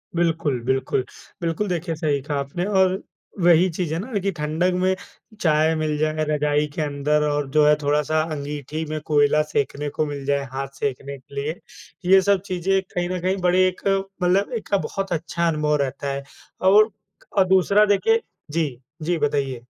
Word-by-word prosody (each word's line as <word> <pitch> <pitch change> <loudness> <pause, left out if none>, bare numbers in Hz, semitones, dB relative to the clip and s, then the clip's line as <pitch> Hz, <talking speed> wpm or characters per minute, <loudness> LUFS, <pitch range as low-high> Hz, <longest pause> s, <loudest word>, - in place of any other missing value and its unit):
बिल्कुल, 165 -6 +1
बिल्कुल। 130 0 0 0.4
बिल्कुल 170 +5 -1
देखिए, 170 -1 -2
सही 150 -3 0
कहा 145 +1 -3
आपने 140 +7 -3
और 190 0 +3 0.4
वही 175 +1 +5
चीज़ 165 -2 -2
है 165 - -1
ना 215 0 -3
कि 195 +1 -1
ठंडक 160 +5 0
में 185 0 +2 0.5
चाय 155 -1 +3
मिल 155 -1 -1
जाए 155 0 0
रजाई 150 0 +1
के 160 - -3
अंदर 150 +1 +1
और 145 -2 -1
जो 150 0 +4
है 150 - +6
थोड़ा-सा 150 +2 +2
अंगीठी 145 +2 -5
में 155 0 -2
कोयला 150 0 +3
सेंकने 145 +1 -1
को 155 - -1
मिल 140 -2 -5
जाए, 140 0 +1
हाथ 135 +1 -3
सेंकने 140 0 -3
के 135 +2 -17
लिए, 150 +4 -2 0.5
ये 190 +1 +6
सब 200 -1 +2
चीज़ें 190 +1 0
कहीं 175 0 -1
न 185 -1 -2
कहीं 190 +2 0
बड़े 185 +1 +4
एक 185 - -4 0.4
मतलब 195 +6 +2
एक - - -9
का 200 - +3
बहुत 195 -1 -4
अच्छा 170 +1 -1
अनुभव 150 -2 +1
रहता 140 +1 -3
है। 140 0 -4 0.4
और 210 +4 +6 0.5
अ, 190 - +7
दूसरा 190 +3 +4
देखिए 450 - +2 0.3
जी, 145 -6 -2 0.2
जी 170 +2 0
बताइए। 140 -4 -1
155 Hz, 180 wpm, -23 LUFS, 145-180 Hz, 0.5 s, अ